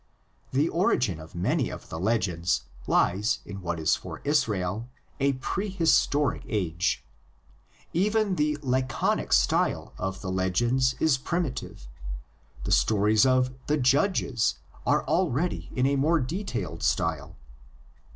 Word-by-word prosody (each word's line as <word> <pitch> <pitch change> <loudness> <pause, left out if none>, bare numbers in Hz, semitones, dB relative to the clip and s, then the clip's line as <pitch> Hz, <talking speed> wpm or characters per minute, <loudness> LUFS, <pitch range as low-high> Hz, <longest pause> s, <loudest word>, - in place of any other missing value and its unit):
The 140 +5 +2
origin 130 - +1
of 80 +2 -12
many 85 - 0
of - - -9
the 80 - -5
legends 90 -4 0 0.2
lies 100 +5 +2
in 100 -1 -7
what 85 -1 -3
is 80 - +3
for - - -8
Israel 110 -7 0 0.3
a 140 0 +2
prehistoric 165 -1 +1
age. 85 - -1 0.9
Even 205 +2 +2
the 150 -2 +1
laconic 130 -2 0
style - - +2
of 95 0 -3
the 95 - -4
legends 120 +8 +1
is 150 -5 +3
primitive; 135 - -3 0.8
the - - -3
stories 110 +3 +4
of 130 0 +2
the 150 - +2
"Judges" 135 - +2 0.3
are - - +2
already 145 - 0
in 125 - +2
a 140 +1 +2
more 160 +5 +3
detailed 175 +10 -4
style. 70 +4 -1
125 Hz, 120 wpm, -27 LUFS, 95-150 Hz, 0.9 s, stories